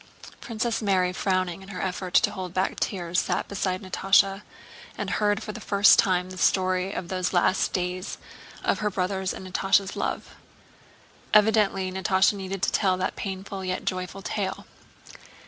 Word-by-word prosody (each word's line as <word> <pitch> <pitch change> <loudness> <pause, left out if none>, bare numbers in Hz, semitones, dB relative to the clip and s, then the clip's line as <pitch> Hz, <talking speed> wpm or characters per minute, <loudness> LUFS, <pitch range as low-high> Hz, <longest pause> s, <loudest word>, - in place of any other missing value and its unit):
Princess 230 0 -2
Mary, 185 -3 +2
frowning 185 -1 -1
in 190 - -12
her 185 -2 -6
effort 185 -1 -3
to - - +5
hold 185 -2 -6
back 185 +1 +2
her - - -13
tears, 175 -3 -1
sat - - -1
beside 190 -1 -2
Natásha, 195 +1 +3 0.6
and - - -3
heard 210 0 +1
for 215 - -5
the - - -9
first 200 0 +5
time 185 -1 +2
the 185 - -8
story 185 0 +2
of 180 - -5
those 185 0 -2
last 180 +1 +2
days 180 +1 -3 0.5
of - - +1
her 210 - 0
brother's 190 0 -1
and 190 - -8
Natásha's 195 +1 +1
love. - - -3 1.0
Evidently 205 -3 +3
Natásha 190 +1 +2
needed 195 -1 -5
to - - +2
tell 190 -3 +2
that 185 0 -2
painful 195 0 -5
yet 185 0 -3
joyful 185 +1 -4
tale. 195 +1 -3
190 Hz, 165 wpm, -26 LUFS, 185-195 Hz, 1.0 s, to